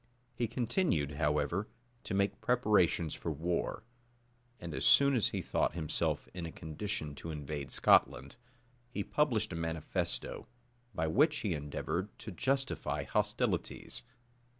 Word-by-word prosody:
He 120 -1 -1
continued, 115 - 0
however, 75 +6 +1 0.4
to 95 - -2
make 100 +1 +1
preparations 105 -9 +3
for - - -3
war; 85 +6 -2 0.8
and 85 -2 -6
as - - -2
soon 140 0 +7
as 115 - +3
he - - -3
thought - - 0
himself 80 -3 -1
in 85 -2 -4
a - - -7
condition 80 -1 -4
to 75 +4 -8
invade 75 -2 -4
Scotland, - - +3 0.5
he 105 -4 -3
published 110 -9 +1
a - - -3
manifesto, 80 -1 -3 0.5
by 80 - 0
which 150 - +3
he 100 -5 0
endeavored 80 +6 -3
to 110 - -7
justify 135 +8 -1
hostilities. - - -1
90 Hz, 130 wpm, -33 LUFS, 80-115 Hz, 0.8 s, soon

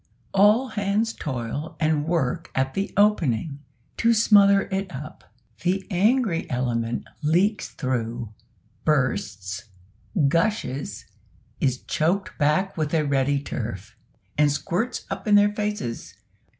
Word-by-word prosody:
All 210 +6 +5
hands 210 +2 0
toil 135 +2 -4
and 155 -1 +1
work 165 0 -1
at 135 0 0
the 195 +1 -2
opening, 155 - +2 0.4
to 230 0 +3
smother 200 -2 +6
it 190 -1 -2
up. 150 +3 -8 0.4
The 190 +2 0
angry 205 -1 +2
element 120 -2 -1
leaks 185 +7 +1
through, 120 -3 -3 0.5
bursts, 125 -10 -1 0.6
gushes 165 - -1 0.5
is 130 -2 0
choked 180 +6 0
back 155 +6 +2
with 155 -1 -1
a 155 - +3
ready 140 0 +1
turf; 110 -6 -6 0.4
and 150 -1 +5
squirts 190 - -2
up - - -5
in 210 - +5
their 205 0 +5
faces. 210 - -4
160 Hz, 115 wpm, -24 LUFS, 130-200 Hz, 0.6 s, smother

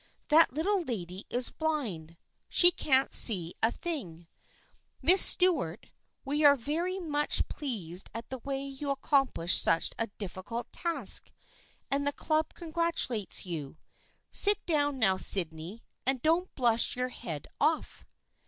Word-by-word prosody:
That 320 +2 +4
little 365 +8 -1
lady 190 - -7
is 245 0 +1
blind. 215 - -5 0.3
She 350 0 +5
can't 270 -5 0
see 180 -7 +8
a 225 - +2
thing. 185 - -7 0.7
Miss 370 +3 +4
Stuart, 295 - +3 0.3
we 295 +3 -2
are 285 -1 +6
very 330 +9 -4
much 295 -4 0
pleased 195 - -5
at 230 +1 -9
the 260 - -6
way 275 +2 -5
you 275 +1 -7
accomplished 270 - 0
such 165 - 0
a 230 - -2
difficult 205 +4 -8
task 325 - 0 0.6
and 280 +1 -1
the 285 - -1
Club 310 +1 -3
congratulates 330 - -2
you. 160 -5 -8 0.5
Sit 410 0 +3
down 290 -4 -1
now, 195 -6 +1
Sydney, 175 +3 +3 0.2
and 265 0 -2
don't 335 +4 0
blush 235 -3 0
your 250 0 -3
head 155 - -8
off." 310 +2 -2
270 Hz, 135 wpm, -28 LUFS, 195-315 Hz, 0.7 s, see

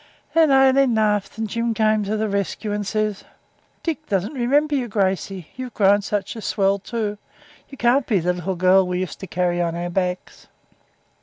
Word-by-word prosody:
Then 325 -2 +5
Aileen 270 -2 +4
laughed, 210 -1 0
and 220 0 -2
Jim 230 +1 -2
comes 215 -1 +2
to 215 +2 -1
the 220 0 0
rescue 200 +1 -2
and 205 -1 -3
says 215 -1 -1 0.6
'Dick 310 -2 -3
doesn't 195 +6 -1
remember 285 +4 +1
you, 260 -4 0
Gracey. 190 -4 -2
You've 255 -1 -7
grown 205 0 +4
such 205 +2 -3
a 225 - -7
swell, 195 -1 +1
too. 210 0 -4 0.5
You 275 - -11
can't 245 +2 +2
be 210 - +2
the 180 0 +1
little 180 +1 -3
girl 185 +1 +4
we 180 0 -1
used 185 - -5
to 190 - -7
carry 175 0 0
on 170 -1 -1
our 175 +1 -4
backs.' 180 0 -3
210 Hz, 185 wpm, -22 LUFS, 190-235 Hz, 0.6 s, Then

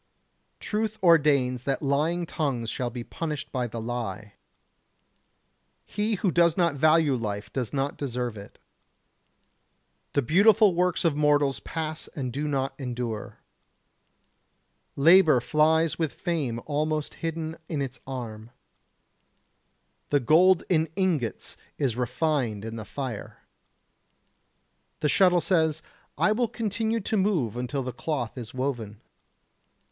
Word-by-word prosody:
Truth 215 0 -2
ordains 140 -7 +4
that 135 +3 -2
lying 155 +5 +1
tongues 130 -9 -2
shall 125 -1 -2
be 120 0 -6
punished 150 +1 -5
by 125 -2 -1
the 115 0 -6
lie. 115 -3 -5 1.5
He 210 +2 -1
who 190 -1 0
does 170 -1 +3
not 170 -3 +3
value 155 0 +4
life 105 -4 -4
does 125 -4 -2
not 140 0 -2
deserve 125 -4 -3
it. 100 -1 -11 1.6
The 140 - +2
beautiful 205 - +5
works 180 0 +1
of 160 -4 +3
mortals 145 -4 +2
pass 155 +6 -4
and 130 -4 -4
do 150 +2 -2
not 135 -2 -1
endure. 120 -4 -5 1.5
Labour 160 -1 +6
flies 160 +5 +2
with 160 -3 -1
fame 150 -10 -2
almost 155 0 -1
hidden 165 -1 -3
in 155 - -2
its 135 -2 -4
arm. 115 -4 -6 1.6
The 145 - +3
gold 170 +8 +5
in 160 -3 +2
ingots 165 - -1 0.2
is 130 -6 0
refined 125 -4 -1
in 115 0 -5
the 110 -2 -6
fire. 120 0 -6 1.6
The 150 - +2
shuttle 180 0 +4
says: 160 -4 +1 0.3
I 215 - +3
will 235 +2 +1
continue 225 0 -2
to 215 +2 -1
move 180 - +1
until 125 +3 -3
the 125 0 -5
cloth 125 -4 -3
is 120 -4 -7
woven. 120 -6 -3
145 Hz, 125 wpm, -26 LUFS, 125-165 Hz, 1.6 s, Labour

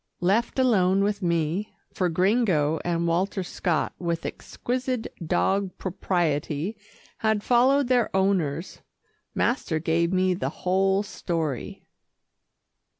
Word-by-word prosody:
Left 210 +9 +1
alone 195 -7 +3
with 205 0 -1
me, 170 +3 -1 0.2
for 180 -2 0
Gringo 180 -4 +2
and 170 -1 0
Walter 185 +3 0
Scott 175 -2 -1
with 170 -2 -2
exquisite 250 -1 -3 0.2
dog 195 +4 +1
propriety 170 -1 -1 0.4
had 220 -2 +1
followed 260 +3 +4
their 245 -3 +2
owners, 185 -5 0 0.5
master 235 - 0
gave 165 +2 +1
me 185 0 +2
the 180 - -2 0.2
whole 190 +2 +2
story. 165 - -4
185 Hz, 105 wpm, -25 LUFS, 170-210 Hz, 0.5 s, followed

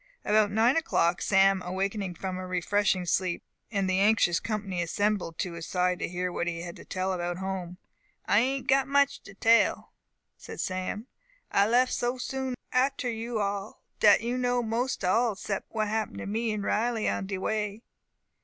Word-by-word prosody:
About 210 -1 +4
nine 225 +5 +3
o'clock 175 - +1
Sam 195 -1 +4
awakened 190 0 -3
from 185 -1 -4
a 185 - -6
refreshing 185 +1 +1
sleep, 175 0 0 0.3
and 200 -4 0
the 185 0 +1
anxious 200 -4 +4
company 205 -4 -3
assembled 200 0 -1
at - - -1
his 165 -1 -7
side 180 -1 +1
to - - -1
hear 180 +1 -3
what 175 - -2
he 170 -1 -3
had 175 -1 -7
to - - -12
tell 185 0 -2
about 175 -1 -2
home. 185 -2 -4 0.5
"I 205 - +4
a'nt 265 +2 -1
got 270 0 +3
much 280 0 +2
to 195 - -13
tell," 230 +3 +3 0.4
said - - -10
Sam, 185 +4 -3 0.5
"I 200 +1 +4
lef 250 +3 +3
so 245 +1 -1
soon 260 0 -3 0.2
a'ter 260 0 +1
you 230 0 -3
all, 200 0 -3 0.2
dat 210 - +6
you 240 +2 -2
know 245 -1 +1
most 230 -1 -1
all 225 +4 +2
sept 195 0 -4
what 215 -1 -1
happen 220 0 -2
to - - -5
me 225 +3 -1
and 210 -1 -3
Riley 225 +2 0
on 195 - -1
de 195 -1 -3
way." 210 +2 -2
205 Hz, 180 wpm, -28 LUFS, 185-230 Hz, 0.5 s, dat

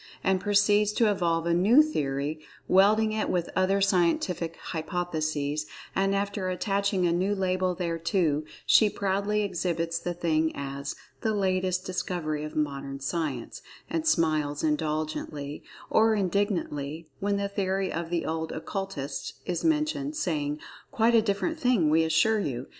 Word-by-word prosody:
and 190 -1 +2
proceeds 205 0 +3
to 215 0 +3
evolve 170 -4 0
a 170 - +2
new 215 - +6
theory, 145 - -2 0.3
welding 215 +3 +4
it 215 0 -1
with 175 -2 -1
other 185 +1 +2
scientific 175 -3 +1
hypotheses, 155 -3 -2 0.3
and 195 +1 +2
after 200 -1 -1
attaching 195 0 0
a 170 - +3
new 185 +4 +1
label 185 -1 0
thereto, 165 -2 0 0.2
she 215 - +6
proudly 200 +2 0
exhibits 170 -3 -1
the 175 -1 -4
thing 160 -2 +1
as 140 0 -5 0.3
"the 220 -3 0
latest 185 -1 0
discovery 170 -5 -2
of 155 - -7
Modern 140 -2 -2
Science"—and 155 - -4
smiles 155 - +1
indulgently, 150 -1 -2 0.3
or 220 0 +4
indignantly, 170 -6 -1
when 200 0 0
the 200 0 -1
theory 195 -1 -1
of 165 0 -3
the 170 -1 -1
old 160 0 -2
Occultists 160 -6 -4
is 175 -2 -2
mentioned, 305 -2 0
saying, 150 - -1 0.3
"Quite 230 +1 +2
a 230 - +6
different 220 - -1
thing, 240 - +3
we 160 +1 +4
assure 160 +8 +3
you!" 130 -9 -3
180 Hz, 140 wpm, -27 LUFS, 155-200 Hz, 0.3 s, new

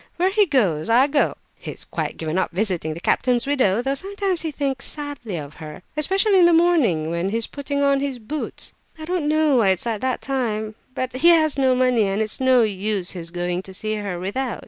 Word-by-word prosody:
Where 365 +2 +2
he 415 -1 +3
goes, 200 - +1
I 245 +4 +5
go. 285 0 +1 0.2
He's - - -8
quite - - -4
given 160 +3 -2
up - - 0
visiting 175 -5 -2
the - - -7
captain's 245 +7 +1
widow, 250 -6 +1
though 270 +1 0
sometimes 390 +3 -2
he 325 - -2
thinks 280 -3 -2
sadly 290 - -5
of 145 -1 -7
her, 155 +2 -9
especially 385 +6 +3
in 350 - +7
the 345 - +5
morning, 290 - +3
when 170 +3 -1
he's 225 +2 0
putting 285 0 -3
on 280 -1 +3
his 275 -2 -3
boots. 285 +7 -5 0.2
I 315 - -8
don't 350 -3 -1
know 310 -3 +3
why 225 -4 +3
it's 190 +2 +1
at 225 -3 -2
that 260 -1 -1
time. 220 -5 -2 0.2
But 255 -1 -3
he 335 - +3
has 315 -3 +4
no 265 -2 +2
money, 250 -4 +2
and 195 +1 -1
it's 215 -1 -2
no 260 -2 +5
use 200 -2 -1
his 170 -3 -6
going 175 +1 -2
to 190 0 -8
see 215 +2 -2
her 205 -4 -4
without. 230 +7 -3
250 Hz, 215 wpm, -22 LUFS, 195-290 Hz, 0.2 s, in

